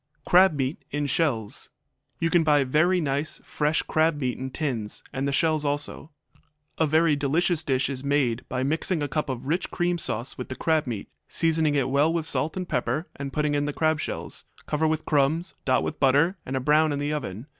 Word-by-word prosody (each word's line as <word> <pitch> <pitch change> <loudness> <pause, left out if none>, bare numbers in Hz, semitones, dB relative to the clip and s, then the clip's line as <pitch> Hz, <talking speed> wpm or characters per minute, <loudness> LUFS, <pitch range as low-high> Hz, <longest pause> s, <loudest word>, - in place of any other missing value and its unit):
Crab 185 0 +6
Meat 135 +1 -2
in 145 0 -2
Shells 130 -7 -1 0.5
You 165 0 0
can 175 -2 +4
buy 150 -2 +4
very 155 +8 +3
nice, 145 0 -1
fresh 150 +1 0
crab 160 -1 +1
meat 125 -3 -1
in 130 0 -5
tins, 125 -7 -3
and 135 +1 -1
the - - 0
shells 155 +1 +2
also. 145 +1 -2 0.7
A 160 - +3
very 155 0 +3
delicious 155 +4 +1
dish 130 -1 +1
is 135 -1 -4
made 140 -5 +1
by 130 0 -1
mixing 160 +3 0
a - - -1
cup 150 +1 -2
of 130 0 -4
rich 165 +6 -1
cream 175 -1 0
sauce 120 -3 -3
with 125 - -5
the 130 - -4
crab 160 -1 +1
meat, 110 -5 -4 0.2
seasoning 160 -2 +1
it 135 -3 +2
well 140 +4 +3
with 165 -2 -1
salt 160 +1 -1
and 185 -1 -3
pepper 160 0 -1
and 140 -1 -5
putting 150 0 0
in 145 0 +1
the 145 - -2
crab 155 0 +1
shells; - - -3 0.2
cover 155 +1 0
with 155 0 -1
crumbs, 150 +4 +1
dot 130 -1 +2
with - - -4
butter, 145 +7 +4
and 130 0 -2
brown 155 +1 +4
in 145 - -1
the 145 +1 -1
oven. 115 -6 -4
145 Hz, 205 wpm, -26 LUFS, 135-160 Hz, 0.7 s, Crab